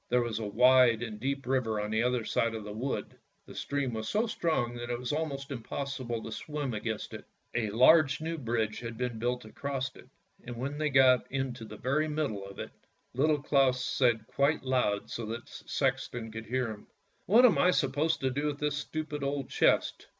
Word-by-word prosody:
There 125 0 +3
was 115 -2 -3
a 110 - -3
wide 125 +1 +5
and 110 -3 -6
deep 135 +2 -2
river 125 -4 0
on 105 +1 -3
the 110 +1 +2
other 125 -2 0
side 115 0 0
of 110 - -5
the 105 0 -7
wood, 125 +6 -4 0.3
the - - -11
stream 140 -3 -2
was 110 0 -3
so 215 +3 +2
strong 160 - 0
that 120 0 -6
it 120 - -1
was 125 +2 -4
almost 145 -3 -3
impossible 130 -1 -4
to 115 - -7
swim 145 +2 -4
against 110 0 -4
it. - - -8 0.3
A 115 -3 0
large 135 +6 +5
new 165 +1 -3
bridge 115 -4 -1
had 115 -1 -6
been 125 -2 -3
built 125 0 -1
across 130 +3 -4
it, - - -15 0.3
and 120 -1 -7
when 140 +4 -4
they 155 -1 +1
got 130 -2 +5
into 130 -4 -3
the 105 0 -10
very 155 +4 0
middle 150 -10 -2
of 100 0 -10
it, - - -6 0.4
Little 145 +2 +2
Claus 130 -3 +3
said 120 -5 +2
quite 140 +6 +1
loud, 125 -6 0
so 115 -2 -4
that 115 +2 -5
the - - -11
sexton 115 -2 -1
could 110 0 -7
hear 125 -1 -1
him 105 -1 -10
— - - -43
" - - -41
What 230 +7 +7
am 240 - +5
I 180 - +5
to 150 -4 +1
do 145 +3 -1
with 145 -1 -2
this 150 0 -1
stupid 150 -1 -4
old 140 -1 -2
chest? - - +2
130 Hz, 210 wpm, -30 LUFS, 115-140 Hz, 0.4 s, What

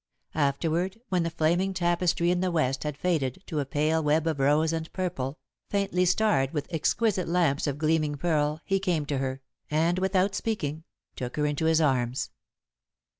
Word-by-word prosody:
Afterward, 165 +7 0
when 180 -2 +2
the 165 - 0
flaming 170 +4 +1
tapestry 175 -1 +1
in 180 - +1
the 185 - +1
West 150 -5 0
had 150 -2 -3
faded 160 -2 -1
to 155 -4 -3
a 140 - -2
pale 155 +3 +1
web 155 +1 +2
of 160 -3 -1
rose 150 +4 +3
and 160 0 -4
purple, 160 -7 -3 0.3
faintly 195 -2 +1
starred 170 -8 +2
with 145 -2 -2
exquisite 185 +4 +1
lamps 165 -5 +1
of 140 -1 -1
gleaming 155 -1 +1
pearl, 150 -1 0
he 195 -1 +1
came 175 -6 0
to 140 -2 -1
her, 135 0 -3 0.3
and, 165 +4 +2
without 190 +1 +2
speaking, 160 -9 -3 0.3
took 125 -1 -5
her 150 - +2
into 150 +2 -1
his 160 0 +4
arms. 130 -4 0
160 Hz, 175 wpm, -27 LUFS, 145-180 Hz, 0.3 s, his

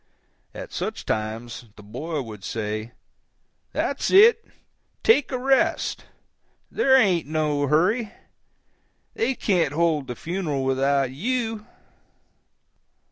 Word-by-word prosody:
At - - -8
such - - -4
times 110 +3 -4
the 105 - -14
boy 140 +8 -4
would 105 -4 -10
say: 110 +2 -4 0.8
"That's - - -1
it! 450 +4 +6 0.6
take 365 -12 +4
a 255 - -1
rest—there 265 0 0
ain't 185 - +2
no 150 -2 0
hurry. 200 - +1 1.0
They 255 +4 0
can't 175 - +1
hold 160 -3 +1
the 125 - -5
funeral 160 -3 -3
without 135 0 +1
YOU." 225 - -3
155 Hz, 100 wpm, -24 LUFS, -, 1.0 s, it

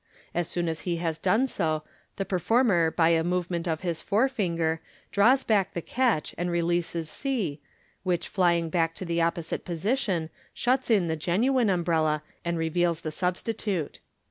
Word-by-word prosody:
As 175 -1 0
soon 175 0 -2
as 160 -1 -2
he 175 -2 -2
has 165 -1 -2
done 205 +9 +3
so, 160 -10 -1 0.3
the 195 - -2
performer 190 -2 +3
by 165 0 +3
a 165 -1 +3
movement 175 0 -1
of 160 -2 -1
his 170 -3 -2
fore 215 +6 +2
finger 170 -10 -1 0.3
draws 245 +7 +4
back 205 -4 +2
the 170 - -1
catch, 240 - 0
and 175 0 0
releases 170 -1 0
c, 195 - -2 0.4
which 180 -3 -1
flying 170 -3 +2
back 165 -1 +1
to 185 - -6
the 170 0 0
opposite 165 0 -1
position, 180 -2 -1 0.2
shuts 255 +1 +1
in 205 -6 +4
the 160 -1 -1
genuine 220 - +2
umbrella, 160 -4 +1 0.2
and 170 0 -1
reveals 170 +1 0
the 155 - -4
sub 180 +3 0
stitute. 200 -7 -3
175 Hz, 170 wpm, -27 LUFS, 165-200 Hz, 0.4 s, draws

